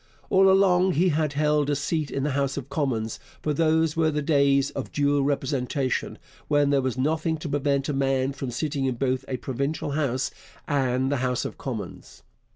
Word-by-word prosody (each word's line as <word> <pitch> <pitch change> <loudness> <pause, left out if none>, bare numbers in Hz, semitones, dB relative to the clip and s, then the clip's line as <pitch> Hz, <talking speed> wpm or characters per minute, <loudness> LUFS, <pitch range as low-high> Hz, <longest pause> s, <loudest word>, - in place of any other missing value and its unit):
All 195 0 +6
along 190 -1 +4
he 180 +5 +3
had 155 -2 0
held 150 0 +1
a 145 - +2
seat 150 +2 -1
in 135 - -2
the 150 - 0
House 140 0 -1
of 140 -1 -5
Commons, 115 -7 -2 0.2
for 150 - 0
those 160 0 +2
were 160 -1 +2
days 140 -2 +2
of - - -5
dual 145 -1 +2
representation, 135 -1 -1 0.3
when 145 -1 +3
there 140 -1 +3
was 130 -1 -2
nothing 160 +4 0
to 155 - -6
prevent 140 -1 0
a 150 - -1
man 135 0 +1
from 135 -1 -5
sitting 140 +2 -2
in 130 -2 0
both 130 +1 -1
a 130 - -2
provincial 140 +4 -3
House 140 -3 -1 0.4
and 130 -2 +1
the 140 - +1
House 125 -1 -1
of - - -6
Commons. - - -7
140 Hz, 185 wpm, -25 LUFS, 135-155 Hz, 0.4 s, All